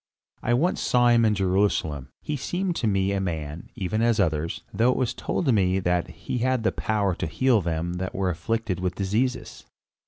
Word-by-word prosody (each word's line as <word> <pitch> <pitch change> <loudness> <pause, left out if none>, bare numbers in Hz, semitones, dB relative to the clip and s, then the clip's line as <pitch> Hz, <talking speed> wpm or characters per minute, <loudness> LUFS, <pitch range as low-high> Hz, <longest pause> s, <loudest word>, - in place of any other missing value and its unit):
"I 120 - +2
once 175 +8 +1
saw 125 -1 +3
him 120 -1 +5
in 105 -1 +3
Jerusalem. 95 -7 0
He 150 - -2
seemed 175 +6 -2
to 115 - 0
me 95 -1 +1
a 100 -1 0
man, 80 -3 -4
even 100 +3 -1
as 115 -1 +2
others, 80 -3 0
though 115 +5 +3
it 125 - +1
was 130 -3 0
told 140 -8 0
me 95 -3 +2
that 90 -1 0
he 85 +8 -5
had 130 -1 +1
the - - +2
power 105 -3 0
to 90 - -3
heal 120 +6 +2
them 85 0 -2
that 95 - -4
were 95 -1 0
afflicted 110 +2 -2
with 90 -1 -2
diseases." 110 +7 -1
100 Hz, 195 wpm, -25 LUFS, 90-120 Hz, -, him